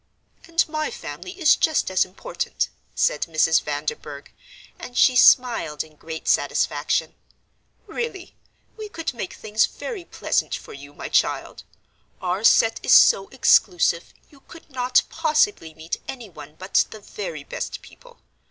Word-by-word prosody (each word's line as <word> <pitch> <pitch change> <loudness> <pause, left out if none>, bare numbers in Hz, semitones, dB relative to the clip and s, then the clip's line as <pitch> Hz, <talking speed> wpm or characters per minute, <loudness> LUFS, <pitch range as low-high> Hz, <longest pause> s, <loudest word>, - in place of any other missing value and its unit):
"And 335 0 +1
my 310 0 -2
family 365 +1 -9
is 315 -4 +5
just 315 - +1
as 185 - +3
important," 195 - -4 0.3
said - - +1
Mrs. 160 0 +3
Vanderburgh, 145 -1 -5 0.5
and 245 - -9
she 255 - +5
smiled 235 - +4
in 155 -1 -19
great 160 +1 -8
satisfaction. - - 0 0.7
"Really, 405 -7 -6 0.4
we 430 -1 -7
could 330 -7 -4
make 230 -6 -6
things 215 0 +1
very 440 -7 -7
pleasant - - -1
for - - -10
you, 140 +1 -12
my - - -6
child; - - 0 0.6
our 185 +3 -2
set 225 0 +4
is - - +3
so 195 0 +6
exclusive, 175 -9 +2 0.2
you 285 - -19
could 325 +2 -16
not 250 -1 +2
possibly 310 - 0
meet 160 +2 -5
any 245 -5 -7
one 150 -2 -12
but 185 +1 +1
the 215 - -10
very 170 -8 -7
best - - -6
people. - - -17
225 Hz, 145 wpm, -23 LUFS, -, 0.7 s, so